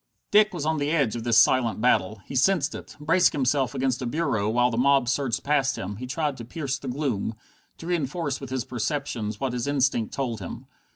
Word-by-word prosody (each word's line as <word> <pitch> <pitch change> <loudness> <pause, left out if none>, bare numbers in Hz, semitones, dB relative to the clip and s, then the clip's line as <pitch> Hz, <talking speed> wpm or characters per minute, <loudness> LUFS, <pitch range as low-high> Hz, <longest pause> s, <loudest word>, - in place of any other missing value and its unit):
Dick 210 +1 +5
was 170 -6 -4
on 160 0 0
the 145 0 0
edge 140 -9 +1
of 115 - -4
this 115 -2 +3
silent 120 -4 +4
battle. 110 -3 +1
He - - -8
sensed 150 +1 +2
it. - - -9
Bracing 165 +3 +3
himself 135 0 +1
against 130 -1 0
a 125 - -2
bureau, 120 -8 0
while 120 +2 +2
the - - -2
mob 135 0 +3
surged 130 -2 0
past 140 -2 +1
him, 100 +2 -5
he 125 +3 -6
tried 145 0 -2
to 120 - -7
pierce 140 +2 -4
the 135 - -8
gloom, 125 -5 -2 0.4
to - - -10
reinforce 160 -4 -2
with 135 - -7
his 130 -2 -2
perceptions 120 -4 -3
what 135 -3 -2
his 125 +1 -2
instinct 135 -5 +1
told 120 -5 -3
him. 90 - -7
135 Hz, 215 wpm, -25 LUFS, 120-145 Hz, 0.4 s, Dick